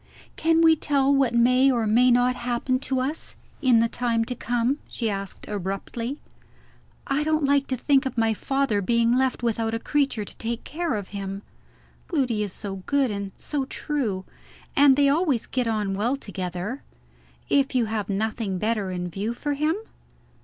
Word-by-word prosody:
"Can 325 0 +3
we 320 -1 +7
tell 280 -2 +2
what 265 -4 +2
may 250 +3 +5
or 235 -3 +1
may 240 +4 +4
not 245 +1 +4
happen 250 +1 -1
to 265 -1 -1
us, 285 +5 -3 0.3
in 250 -5 +5
the 230 - +3
time 230 -1 0
to 250 - -3
come?" 245 +3 0
she 225 -3 -2
asked 195 -1 -6
abruptly. 210 +6 -4 0.9
"I 280 +2 0
don't 310 -1 +1
like 280 0 +2
to 260 - -1
think 270 +1 +2
of 255 -1 -7
my 225 -1 +3
father 270 -2 0
being 235 +3 +2
left 260 -1 +1
without 225 -1 0
a - - -2
creature 275 -6 0
to - - -10
take 230 0 -4
care 330 -3 -2
of 200 -3 -5
him. 195 0 -5 0.6
Gloody 255 - 0
is 205 -2 -2
so 195 0 -6
good 280 -4 +2
and 200 -1 -4
so 285 -3 -3
true; 240 -11 -2 0.5
and 280 -1 +6
they 285 0 +4
always 285 -4 +2
get 250 -2 -1
on 210 -3 0
well 225 +7 0
together. 190 +1 -5 0.7
If 275 -1 +2
you 245 -2 +3
have 215 -2 -3
nothing 210 -1 -1
better 215 -1 -1
in 180 -1 -3
view 200 +7 -3
for 290 +3 -2
him 305 +3 +1
240 Hz, 175 wpm, -25 LUFS, 210-275 Hz, 0.9 s, we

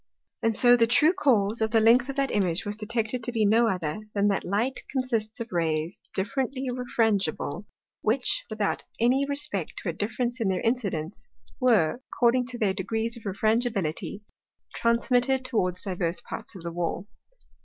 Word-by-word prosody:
And 225 -1 +1
so 245 +1 +6
the 230 -1 +3
true 300 +8 +4
cause 230 - +2
of 220 - +2
the 225 0 +3
length 240 +4 +5
of 275 - -3
that 275 -2 0
Image 185 -3 0
was 205 0 -3
detected 225 +2 -2
to 245 - -2
be 225 -3 +1
no 225 +3 +4
other, 180 -3 -2 0.2
than 205 0 +3
that 195 - 0
Light 225 +8 -1
consists 235 -5 -2
of 230 0 -6
Rays 165 0 -1
differently 260 +6 -2
refrangible, 215 - -1 0.4
which, 245 +4 +1
without 215 -2 -1 0.2
any 260 +4 +3
respect 280 - -2
to - - -4
a - - -2
difference 235 +6 -2
in 220 - +1
their 185 -2 0
incidence, 205 -8 -2 0.3
were, 240 - +3
according 245 0 +2
to 250 -1 -5
their 210 -4 +1
degrees 225 +4 -2
of 235 - -12
Refrangibility, 210 -3 -1 0.5
transmitted 245 +2 +2
towards 185 -8 -1
divers 180 -2 -1
parts 225 -2 -5
of 180 - -9
the 170 - -4
Wall. 175 +2 -3
225 Hz, 165 wpm, -26 LUFS, 195-245 Hz, 0.5 s, so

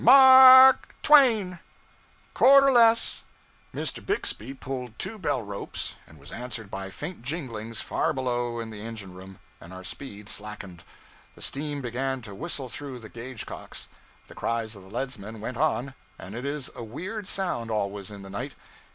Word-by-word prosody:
M - - -5
a - - +10
r 260 -1 +10
k - - -20 0.2
twain!... 225 - +5 0.7
Quarter 275 +1 +7
less 230 -2 +4 0.3
' - - -33
Mr. - - -3
Bixby 135 - -2
pulled 125 -4 -6
two 220 - -4
bell 130 - -1
ropes, 100 -1 -4
and 80 - -17
was 70 0 -13
answered 120 -4 -6
by 95 0 -5
faint 155 - -7
jinglings 115 -6 -5
far - - -1
below 120 -2 -2
in 115 -1 -6
the 105 -1 -9
engine 110 -4 -8
room, 95 +1 -12 0.2
and 85 - -13
our 95 0 -9
speed 105 -1 -7
slackened. 105 -5 -6 0.5
The - - -16
steam 145 0 -3
began 130 +1 -3
to 100 -2 -10
whistle 140 - -3
through 135 +1 -7
the 110 -3 -11
gauge 120 +1 -8
cocks. - - -9 0.4
The - - -14
cries 115 -1 -3
of 100 - -12
the 95 - -15
leadsmen 115 -2 -5
went 115 +3 -6
on 135 -3 0 0.2
and 95 - -10
it 120 +4 -6
is 140 -2 -3
a - - -7
weird 185 - -6
sound, 175 -15 -2
always, 100 -2 -3
in 100 -1 -10
the 95 - -10
night. 125 +8 -5
120 Hz, 175 wpm, -26 LUFS, 105-155 Hz, 0.7 s, a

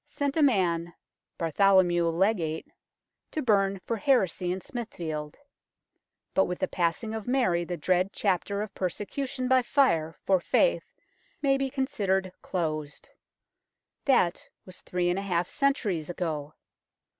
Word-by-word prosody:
sent 285 -1 -2
a 320 - +2
man 175 - +2 0.4
Bartholomew 175 +1 +3
Legate 165 -2 0 0.6
to 310 - -3
burn 195 -4 +2
for 230 - -1
heresy 190 - +2
in 185 - -2
Smithfield; 170 - -5 1.0
but 190 - +4
with 180 - -3
the 185 - -1
passing 180 +7 -1
of 220 -1 -5
Mary 240 -10 +2
the 175 0 -4
dread 185 +4 +1
chapter 200 +1 0
of 215 - -8
persecution 255 +8 -3
by 260 0 +5
fire 170 - +2
for 190 -1 +4
faith - - +1 0.5
may 275 -1 +4
be 270 0 -1
considered 200 -9 -1
closed. 155 -4 -3 1.0
That 220 -10 +2 0.2
was 185 -1 -9
three 180 -1 -1
and 180 - -1
a - - -3
half 180 -3 0
centuries 210 - 0
ago. 155 -4 -4
190 Hz, 135 wpm, -28 LUFS, 170-240 Hz, 1.0 s, by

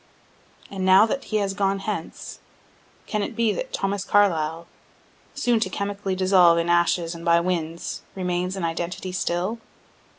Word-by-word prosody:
And 195 -1 -4
now 190 +3 +7
that 270 +4 -3
he 215 - -1
has 200 -2 -1
gone 195 0 0
hence, 195 -4 -6 0.7
can 210 - -2
it - - -4
be 230 -2 +2
that - - -5
Thomas 195 - -2
Carlyle, 170 -5 +1 0.7
soon 245 -5 +2
to 190 - -1
chemically 200 0 -3
dissolve 185 -2 +5
in 170 0 0
ashes 175 0 +2
and 170 0 -9
by 170 0 +4
winds, 170 -2 -3
remains 180 0 -2
an 190 -3 -2
identity 175 +2 -4
still? 185 +4 -2
185 Hz, 155 wpm, -24 LUFS, 170-200 Hz, 0.7 s, now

